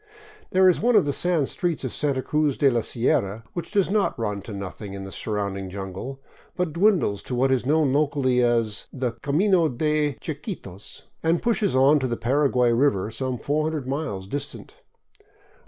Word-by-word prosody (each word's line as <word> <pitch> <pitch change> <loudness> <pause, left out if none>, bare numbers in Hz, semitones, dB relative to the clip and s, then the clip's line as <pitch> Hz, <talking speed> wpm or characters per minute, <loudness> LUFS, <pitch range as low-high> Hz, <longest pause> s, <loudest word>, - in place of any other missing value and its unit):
There 185 0 +4
is 180 - +3
one 240 +2 +3
of - - +5
the 145 - 0
sand 170 -5 +1
streets 175 -5 -2
of 130 - -3
Santa 140 -3 0
Cruz 150 -2 0
de 140 -3 +4
la 120 -1 +1
Sierra 110 -2 0
which 170 -2 -5
does 200 -3 +1
not 205 -1 +1
run 105 -3 -2
out - - -12
to - - -8
nothing 100 0 -7
in 100 0 -6
the 95 - -8
surrounding 100 -3 -3
jungle, 95 +8 -6 0.4
but 180 -4 -1
dwindles 170 - +2
to 125 - -5
what 130 +2 +2
is 130 -1 +1
known 150 -2 +3
locally 140 -4 +2
as 115 -4 0
the 125 -3 -2
" 115 - -24
camino 170 +3 +3
de 150 +3 0
Chiquitos," 150 - -8 0.2
and 165 +1 +1
pushes 215 - +1
on 140 +3 +5
to 130 - -1
the 120 -1 -2
Paraguay 125 0 +2
river, 115 -5 +1
some 130 +2 -3
400 150 +2 -1
miles 135 -9 -3
distant. 140 +7 -6
135 Hz, 185 wpm, -24 LUFS, 115-155 Hz, 0.4 s, of